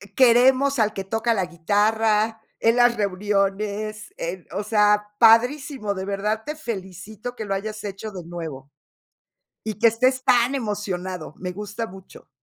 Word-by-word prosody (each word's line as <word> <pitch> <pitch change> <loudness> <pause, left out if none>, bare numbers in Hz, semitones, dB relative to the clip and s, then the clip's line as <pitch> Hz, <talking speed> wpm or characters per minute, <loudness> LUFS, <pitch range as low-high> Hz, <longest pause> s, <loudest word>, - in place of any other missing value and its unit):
queremos 260 +2 +5
al 215 -1 +2
que 195 - -4
toca 225 +4 0
la 195 -4 0
guitarra, 215 +5 +1 0.2
en 230 +1 +3
las 240 -1 +4
reuniones, 205 +1 -1
en, 175 +1 -5
o 200 +3 -3
sea, 210 -1 +3
padrísimo, 245 0 +4
de 190 -1 -5
verdad 205 +2 -1
te 300 - -4
felicito 215 - -7
que 220 - -5
lo 195 - -2
hayas 215 +2 -4
hecho 205 +1 -6
de 185 -3 -8
nuevo. 160 -5 -8 0.9
Y 215 -1 -4
que 230 - +6
estés 255 +3 +1
tan 245 +2 +4
emocionado, 190 - -4
me 180 0 -5
gusta 210 +4 -5
mucho. 190 -2 -14
210 Hz, 150 wpm, -23 LUFS, 195-230 Hz, 0.9 s, que